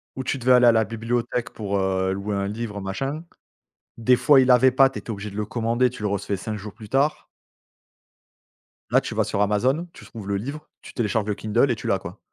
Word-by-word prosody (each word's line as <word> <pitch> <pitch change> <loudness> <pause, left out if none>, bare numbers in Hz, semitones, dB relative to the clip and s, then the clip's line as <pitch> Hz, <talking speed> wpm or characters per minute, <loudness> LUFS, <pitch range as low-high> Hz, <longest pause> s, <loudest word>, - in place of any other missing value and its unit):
ou 130 - -4
tu 130 - -2
devais 130 0 +1
aller 125 -1 +6
à - - +8
la 110 -1 +3
bibliothèque 115 +2 -2
pour, 100 -2 -4
heu, 95 0 0
louer 100 +1 -3
un 100 0 -1
livre 105 0 -5
machin. 135 +11 -4 0.7
Des 125 +2 +3
fois 135 +2 +6
ils 130 - +2
l'avaient 130 +1 +6
pas, 135 +1 +5
tu - - -7
étais - - -14
obligé 105 -1 -5
de 100 - -9
le 105 - -1
commander, 120 +3 +1
tu 125 - -11
le 105 - 0
recevais 100 0 -2
5 105 +3 -5
jours 105 0 -9
plus 105 -2 -12
tard. 140 +5 +1 1.6
Là, - - +5
tu - - -6
vas - - +1
sur 100 - -2
Amazon, 125 - +1
tu - - -14
trouves 110 -4 -10
le 100 - 0
livre, 140 +9 -6
tu - - -11
télécharges 110 -2 0
le 105 - -1
Kindle 115 +6 +1
et 120 - +1
tu - - -8
l'as, 100 - +2
quoi. 95 +1 -10
110 Hz, 235 wpm, -23 LUFS, 100-125 Hz, 1.6 s, à